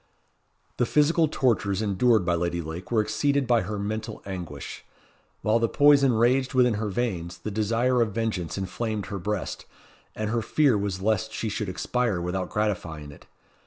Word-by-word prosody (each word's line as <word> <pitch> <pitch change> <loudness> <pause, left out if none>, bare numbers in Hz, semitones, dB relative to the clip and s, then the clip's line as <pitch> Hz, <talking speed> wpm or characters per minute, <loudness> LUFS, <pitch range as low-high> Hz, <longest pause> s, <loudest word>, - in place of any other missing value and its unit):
The 120 - +1
physical 160 +2 +3
tortures 110 -9 +1
endured 110 0 +2
by 90 - +2
Lady 85 0 -1
Lake 85 +2 -6
were 110 -3 +2
exceeded 140 +6 +1
by 120 -2 +3
her 105 +3 -4
mental 110 +2 -4
anguish. 90 -3 -7 0.6
While 110 +2 +3
the 115 -1 +1
poison 140 -3 +5
raged 125 +4 +2
within 125 -2 +4
her 105 - -1
veins, 90 -6 -2
the 105 - -6
desire 115 +4 +1
of 110 -2 +1
vengeance 100 -7 -2
inflamed 105 +2 -3
her 100 - -5
breast; 105 +1 -3 0.5
and 110 0 -2
her 115 0 +1
fear 140 0 +3
was 100 -2 -2
lest 110 +1 +1
she 110 - -2
should 105 -1 -3
expire 115 +1 -1
without 90 +2 -3
gratifying 85 -8 -2
it. 70 - -16
110 Hz, 165 wpm, -26 LUFS, 95-120 Hz, 0.6 s, poison